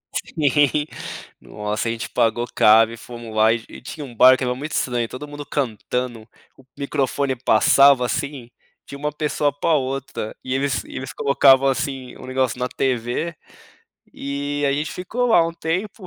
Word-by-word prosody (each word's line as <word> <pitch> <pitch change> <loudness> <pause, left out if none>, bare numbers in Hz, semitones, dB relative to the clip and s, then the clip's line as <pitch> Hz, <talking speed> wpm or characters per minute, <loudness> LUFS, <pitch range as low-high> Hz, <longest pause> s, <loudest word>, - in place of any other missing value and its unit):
Sim. 145 0 +1 0.6
Nossa, 105 +2 -3
a - - 0
gente 115 0 -5
pagou 115 +1 +1
caro 110 +1 +6
e - - -9
fomos 120 -1 -9
lá, 110 +1 +5
e 115 -1 -4
e - - -11
tinha 145 +3 -7
um 120 -3 -12
bar 130 +3 +7
que - - -4
era 125 0 -1
muito 150 +5 -6
estranho, 120 -2 -1
todo 130 +5 -8
mundo 145 0 -8
cantando, 125 -3 -3 0.3
o 135 - -18
microfone 140 -1 -1
passava, 130 +2 +5
assim, 140 -1 -4 0.4
de - - -8
uma 150 +2 -3
pessoa 150 -1 0
pra 145 +4 0
outra, 135 -5 -3
e 130 - -3
eles 135 -1 0
e - - -11
eles 130 0 -6
colocavam, 135 -1 +4
assim, 135 -1 -2
o - - -11
negócio 130 -1 -1
na 125 - 0
TV, 130 +6 -2 0.8
e 145 +1 -3
a - - +2
gente 150 +3 -2
ficou 230 +7 -2
lá 175 -8 +5
um 165 - -4
tempo, 185 +5 -3
135 Hz, 175 wpm, -21 LUFS, 120-145 Hz, 0.8 s, bar